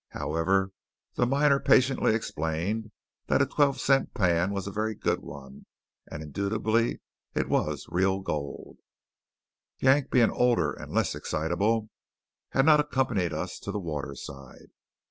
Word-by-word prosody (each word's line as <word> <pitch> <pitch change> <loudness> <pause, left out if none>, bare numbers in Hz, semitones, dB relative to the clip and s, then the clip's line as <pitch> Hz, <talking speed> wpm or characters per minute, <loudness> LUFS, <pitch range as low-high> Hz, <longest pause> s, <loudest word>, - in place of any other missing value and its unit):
However, 95 +5 0 0.4
the 120 - +1
miner 140 +1 +3
patiently 130 -5 +3
explained 95 +3 -2 0.4
that - - +3
a - - +4
twelve 140 -3 +1
cent 135 +1 +2
pan 90 -1 +2
was 100 -2 -3
a 100 - -4
very 110 +2 -2
good - - 0
one; 70 -1 -11 0.4
and 75 - -6
indubitably 110 +8 0 0.3
it - - 0
was - - -1
real 95 +2 +1
gold. 75 -6 -5 1.0
Yank, 135 +1 +3
being 120 -3 +4
older 105 - +2
and - - -10
less - - +1
excitable, 100 +8 -1 0.6
had 135 - +2
not 155 -1 +6
accompanied 130 - 0
us 85 +4 -4
to 100 - -5
the 105 - -3
waterside. 70 -5 -7
100 Hz, 135 wpm, -27 LUFS, 80-120 Hz, 1.0 s, not